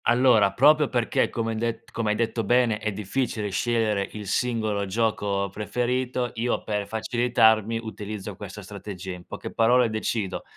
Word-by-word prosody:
Allora, 120 -4 +5
proprio 150 +2 +5
perché 120 -2 +1
come 115 -1 -2
hai 110 - -3
det 115 0 -2
come 115 -2 -2
hai 105 - +2
detto 115 0 -1
bene, 120 0 +2
è 110 0 -2
difficile 105 +1 -2
scegliere 105 -1 0
il 105 -1 -7
singolo 110 -2 0
gioco 100 -1 0
preferito, 125 +4 -1
io 120 +2 -1
per 105 -1 -2
facilitarmi 110 -1 +2
utilizzo 105 -2 -6
questa 105 +1 -9
strategia. 95 -1 -7
In 90 0 -11
poche - - -7
parole 120 +1 +4
decido 110 -2 -2
110 Hz, 155 wpm, -25 LUFS, 105-120 Hz, -, Allora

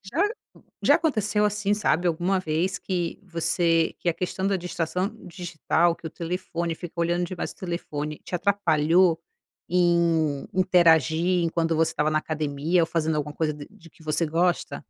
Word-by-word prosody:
Já 245 - -1 0.6
já - - +5
aconteceu 215 -8 +1
assim, 210 0 +1
sabe, 180 -4 +1
alguma 175 +3 +1
vez 165 +2 -1
que 175 -3 -3
você 165 -2 +1
que - - -6
a 170 - +3
questão 190 +2 -2
da 195 - +1
distração 180 +2 -2 0.2
digital, 170 -1 0
que 165 - -8
o - - -8
telefone 170 0 -3
fica 175 +1 -9
olhando 175 +1 +1
demais 175 0 -5
pro 185 - -9
telefone, 150 -3 -4
te - - -12
atrapalhou 175 -2 +3 0.5
em 170 -4 +2
interagir, 175 -1 +3
enquanto 165 0 0
você 160 +1 +2
estava 150 +1 0
na 155 - +1
academia 155 +2 0
ou 165 - +1
fazendo 160 -1 0
alguma 150 0 -3
coisa 155 -2 0 0.2
de 200 -5 -17
que 165 - -23
você 155 +2 0
gosta? 170 +3 0
170 Hz, 160 wpm, -25 LUFS, 160-180 Hz, 0.6 s, já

